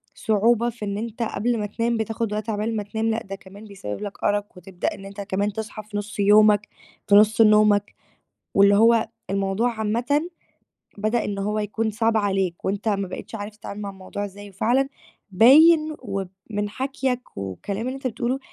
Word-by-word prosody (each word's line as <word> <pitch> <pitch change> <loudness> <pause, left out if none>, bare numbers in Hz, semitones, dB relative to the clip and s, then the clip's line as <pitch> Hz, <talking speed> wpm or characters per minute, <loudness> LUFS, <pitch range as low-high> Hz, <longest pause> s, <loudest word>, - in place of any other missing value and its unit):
صعوبة 230 +2 +2
في 230 -2 -7
إن 200 0 -3
أنت 230 +2 -4
قبل 230 +1 -1
ما 210 - -1
تنام 230 +3 -1
بتاخُد 225 0 -2
وقت 215 +1 -3
عقبال 215 +2 -1
ما 210 - -2
تنام 220 +2 -2
لأ، 225 +1 -1
ده 195 0 -7
كمان 195 +2 -13
بيسبّب 185 - -7
لك 205 -1 -7
أَرَق 205 0 +1
وتبدأ 180 0 -4
إن 195 - -11
أنت 200 +1 -8
كمان 200 +1 -1
تصحى 215 -1 -6
في 210 0 -6
نُصّ 205 +1 -6
يومك 210 0 +5 0.4
في 200 - +5
نُصّ 215 +2 +6
نومك، 210 -1 +4 0.6
واللي 200 0 +6
هو 230 +1 +4 0.2
الموضوع 195 +5 0
عامةً 240 +9 0 0.7
بدأ 215 +3 0
إن 205 -1 -3
هو 210 +2 -1
يكون 220 +1 -1
صعب 225 +1 +1
عليك 195 -4 -1
وأنت 200 +3 -2
ما 200 -2 -1
بقيتش 185 - -8
عارف 210 0 -6
تتعامل 205 0 -7
مع 200 - -4
الموضوع 195 +1 -6
إزاي 205 +1 -10
وفعلًا 240 +8 +1 0.4
باين 305 - +6
وب 195 -6 -4 0.2
من 205 -1 -2
حكيَك 260 - -3
والكلام 100 - -4
اللي 260 - -3
أنت 270 -1 -3
بتقولُه 245 +3 -2
210 Hz, 180 wpm, -23 LUFS, 200-230 Hz, 0.7 s, نُصّ